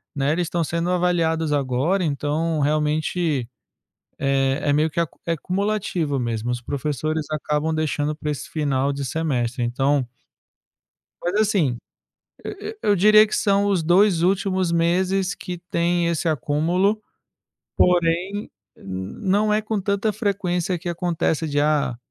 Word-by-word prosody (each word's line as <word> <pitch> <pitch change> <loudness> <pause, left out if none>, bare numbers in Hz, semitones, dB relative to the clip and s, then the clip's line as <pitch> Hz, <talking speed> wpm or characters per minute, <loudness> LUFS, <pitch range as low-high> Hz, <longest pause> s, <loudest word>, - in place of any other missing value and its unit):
né, 140 +1 +1
eles 175 +2 0
estão 175 0 -1
sendo 170 +2 -2
avaliados 165 -3 +1
agora, 140 +7 +1
então, 155 +1 -1
realmente, 150 -2 0 0.7
eh, 135 0 +1
é 145 - +2
meio 155 +2 +2
que 165 - -3
ac 165 - 0 0.2
é 170 - -1
acumulativo 185 -4 -1
mesmo. 120 -1 -2
Os 120 0 -3
professores 150 +4 -2
acabam 150 +1 -1
deixando 155 -1 -1
pra 150 0 -3
esse 145 - -6
final 140 -3 0
de 140 -1 -4
semestre. 130 -4 -1
Então 135 +2 +1 1.2
Mas, 175 - -1
assim. 190 - +2 0.7
E 415 +1 -6
e - - -17
eu 205 - +3
diria 215 +3 +6
que 215 - -4
são 200 -1 +2
os 195 -4 +1
2 175 +1 +4
últimos 190 -1 +1
meses 185 +3 +1
que 180 -2 -6
têm 170 0 +1
esse 170 0 0
acúmulo, 165 - +1 0.8
porém, 180 +3 +1 0.3
n 95 0 -7
não 210 +1 +2
é 215 - +2
com 215 -2 -2
tanta 200 +2 0
frequência 185 -4 -1
que 175 +2 -6
acontece 170 -2 -1
de, 145 0 0
ah, 145 -5 +1
165 Hz, 145 wpm, -22 LUFS, 145-185 Hz, 1.2 s, diria